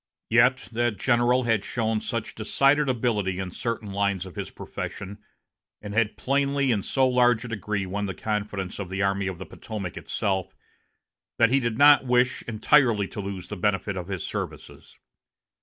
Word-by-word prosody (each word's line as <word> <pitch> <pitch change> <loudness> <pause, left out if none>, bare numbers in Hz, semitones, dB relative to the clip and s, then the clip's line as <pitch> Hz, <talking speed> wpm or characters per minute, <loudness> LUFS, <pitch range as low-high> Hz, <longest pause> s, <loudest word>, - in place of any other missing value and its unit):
Yet 125 +3 +4
that 120 -2 0
general 120 +3 +2
had 115 -4 +1
shown 110 -2 -1
such 115 -2 -4
decided 135 +6 +2
ability 110 -7 0
in 95 -1 -4
certain 115 0 -4
lines 100 -2 0
of 95 - -11
his - - -5
profession, 100 +2 -7 0.6
and 105 -1 -7
had 110 0 +1
plainly 140 0 +1
in 105 -4 +1
so 130 +6 +2
large 125 -2 +3
a - - -7
degree 105 -2 -2
won 100 +2 -3
the 95 - -5
confidence 105 -3 -3
of 95 -3 -5
the 95 +1 -1
Army 100 0 0
of 95 -2 -4
the 95 - -7
Potomac 100 -6 -7
itself, 95 -2 -2 0.8
that 115 0 +4
he 135 - +4
did 120 -3 -2
not 145 0 +7
wish 125 0 +2
entirely 115 -2 +3
to 105 - -5
lose 95 -2 -6
the 105 - -4
benefit 100 +1 0
of 90 -2 -5
his 95 -3 -4
services. - - -7
110 Hz, 175 wpm, -25 LUFS, 100-125 Hz, 0.8 s, not